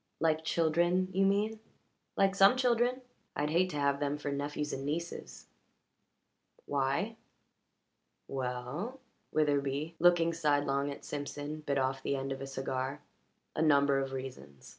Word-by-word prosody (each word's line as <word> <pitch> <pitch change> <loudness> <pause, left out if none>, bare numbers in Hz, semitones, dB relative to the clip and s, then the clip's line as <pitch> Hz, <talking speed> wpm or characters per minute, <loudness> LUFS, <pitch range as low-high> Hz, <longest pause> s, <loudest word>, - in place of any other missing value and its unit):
"Like 160 -1 +2
children, 170 +3 +2
you 195 +1 +4
mean?" 210 +3 +1 0.6
"Like 195 0 +4
some 195 +4 +6
children. 250 0 +2 0.3
I'd 150 +1 0
hate 180 +3 +3
to 150 - -4
have 140 -1 +1
them 145 0 -1
for 145 -1 -3
nephews 145 +1 -2
and 135 - -4
nieces." 165 +4 -4 1.2
"Why?" 145 +11 0 1.1
"We 135 -1 -3
ell" 135 - -4 0.3
Witherbee, 145 +1 +1
looking 170 -1 +5
sidelong 145 -3 +1
at 140 - -8
Simpson, 145 +1 -5
bit 145 -2 -1
off 135 0 0
the 140 - -1
end 135 0 -3
of 135 0 -4
a 135 - -4
cigar 135 +1 -3 0.5
"a - - 0
number 140 -3 +4
of 135 0 -2
reasons. 125 - -8
145 Hz, 140 wpm, -32 LUFS, 135-175 Hz, 1.2 s, some